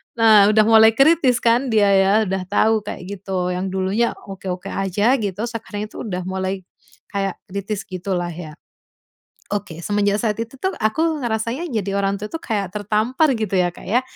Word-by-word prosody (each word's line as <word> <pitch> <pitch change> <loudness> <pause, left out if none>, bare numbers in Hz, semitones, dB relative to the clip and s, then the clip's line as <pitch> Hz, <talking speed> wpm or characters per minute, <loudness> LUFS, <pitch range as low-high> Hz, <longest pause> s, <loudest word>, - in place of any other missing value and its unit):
Nah, 215 -2 +6
udah 215 - +5
mulai 220 0 +7
kritis 275 -2 +4
kan 240 +3 +3
dia 205 -2 +4
ya, 195 0 +4 0.2
udah 190 -1 -2
tahu 215 +2 +2
kayak 195 - -6 0.2
gitu, 185 -2 -2
yang 180 +2 -2
dulunya 190 +5 0 0.2
oke-oke 185 -1 -5
aja 205 +7 +1
gitu, 205 -1 -3
sekarang 210 -2 -6
itu - - -8
udah 185 -3 -3
mulai 190 0 -3 0.5
kayak 195 -1 -3
kritis 200 +2 -4
gitulah 180 -1 -3
ya. 160 -2 -8 1.0
Oke, 175 -5 -5
semenjak 205 0 +1
saat 215 -2 +1
itu 230 +4 -7
tuh, 380 +8 -2
aku 310 +8 +1
ngerasanya 235 +8 -2
jadi 200 -6 -2
orang 200 0 0
tua 210 - -6
tuh 325 - -5
kayak 200 - -3
tertampar 215 - +1
gitu 215 -3 -3
ya, 180 -1 +3
Kak, 175 - -13
ya. 235 +6 +2
205 Hz, 175 wpm, -21 LUFS, 190-225 Hz, 1.0 s, mulai